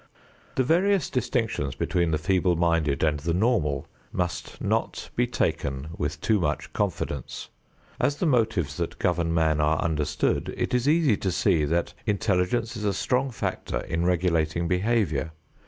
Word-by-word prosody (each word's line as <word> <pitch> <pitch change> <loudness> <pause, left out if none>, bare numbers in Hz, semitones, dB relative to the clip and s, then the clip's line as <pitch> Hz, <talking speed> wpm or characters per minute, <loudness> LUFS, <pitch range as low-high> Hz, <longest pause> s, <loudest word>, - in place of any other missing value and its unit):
The 130 - +3
various 180 +4 +2
distinctions 115 - -1
between 85 -2 0
the 80 - +1
feeble 90 +2 +2
minded 85 -4 +1
and 75 -2 +2
the 85 +3 -1
normal 90 - +1 0.3
must 90 -1 -3
not - - -2
be - - +2
taken 70 +2 -1
with 75 -1 -3
too 110 0 +2
much 85 - -2
confidence. 70 -4 -3 0.5
As 145 - +2
the 180 - -1
motives 110 - +1
that 85 -1 -3
govern 85 -2 +1
man 80 -2 +2
are 75 +1 +2
understood, 75 -3 0
it - - -1
is 125 +3 +2
easy 150 -9 +4
to 95 - -1
see 80 -3 +2
that 85 +3 0
intelligence 105 +3 +1
is 110 - -5
a 100 -1 +1
strong 130 +5 +1
factor 120 - -3
in 80 +1 -2
regulating 85 -2 +1
behavior. 90 - 0
85 Hz, 155 wpm, -26 LUFS, 80-110 Hz, 0.5 s, easy